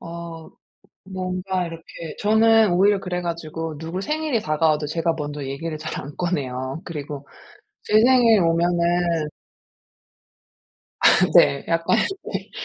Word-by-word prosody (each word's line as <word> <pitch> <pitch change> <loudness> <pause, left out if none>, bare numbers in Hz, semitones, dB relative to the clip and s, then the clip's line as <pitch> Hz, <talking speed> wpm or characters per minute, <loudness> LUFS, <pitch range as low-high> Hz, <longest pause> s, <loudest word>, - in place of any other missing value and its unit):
어 170 -1 -8 0.6
뭔가 185 -1 -3
이렇게 165 -1 -9 0.3
저는 220 -1 +4
오히려 200 +3 +4
그래 180 -2 -4
가지고 165 -2 -5
누구 165 +3 -5
생일이 300 0 -1
다가와도 155 -2 +1
제가 165 +2 -1
먼저 145 -2 -5
얘기를 155 +4 -5
잘 - - -5
안 140 +2 -10
꺼내요. 135 -4 -3
그리고 145 -3 -7 0.6
제 - - -4
생일 240 -4 +5
오면은 170 -1 +1 1.7
아 - - +4 0.3
네. 140 - +5
약간 165 +6 +2 0.4
네. - - -5
170 Hz, 240 characters per minute, -22 LUFS, 155-185 Hz, 1.7 s, 생일